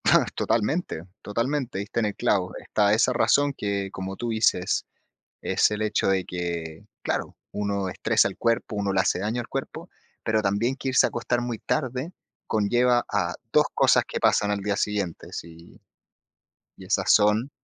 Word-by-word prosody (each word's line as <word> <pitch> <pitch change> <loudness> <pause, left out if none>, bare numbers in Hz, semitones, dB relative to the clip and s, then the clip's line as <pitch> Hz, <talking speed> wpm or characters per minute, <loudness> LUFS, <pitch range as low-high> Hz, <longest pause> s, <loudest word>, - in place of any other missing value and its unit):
Ah, - - +5
totalmente, 115 - 0 0.2
totalmente, 120 +2 -2
diste 105 +4 -3
en 110 - +1
el 105 - -4
clavo. 95 -2 +1
Está 105 -1 +1
esa 120 +3 +3
razón 145 +3 +3
que, 100 -4 -2
como 95 0 -5
tú 120 - -3
dices, 110 -5 +1 0.6
es - - +2
el 105 0 -2
hecho 110 -1 +1
de 95 -1 +2
que, 85 -3 -5 0.2
claro, - - -2 0.2
uno 100 -2 -2
estresa - - +2
el - - -11
cuerpo, 115 -2 0
uno 100 -1 0
le 95 - +4
hace 90 - +1
daño 110 +5 -1
al 115 - -9
cuerpo, - - -5 0.3
pero 110 -1 +1
también, 105 +6 0
que 135 - -3
irse 130 - +5
a - - 0
acostar 120 +1 -1
muy 120 -2 -3
tarde 130 +2 -2 0.4
conlleva 120 +3 +2
a - - 0 0.2
2 - - +5
cosas - - +4
que - - -3
pasan 105 - +3
al 100 - 0
día 100 0 -1
siguiente, 100 -6 -2
sí, 85 0 -10 1.0
y 95 - -12
esas 100 - +2
son 105 +5 +3
105 Hz, 175 wpm, -25 LUFS, 95-120 Hz, 1.0 s, Ah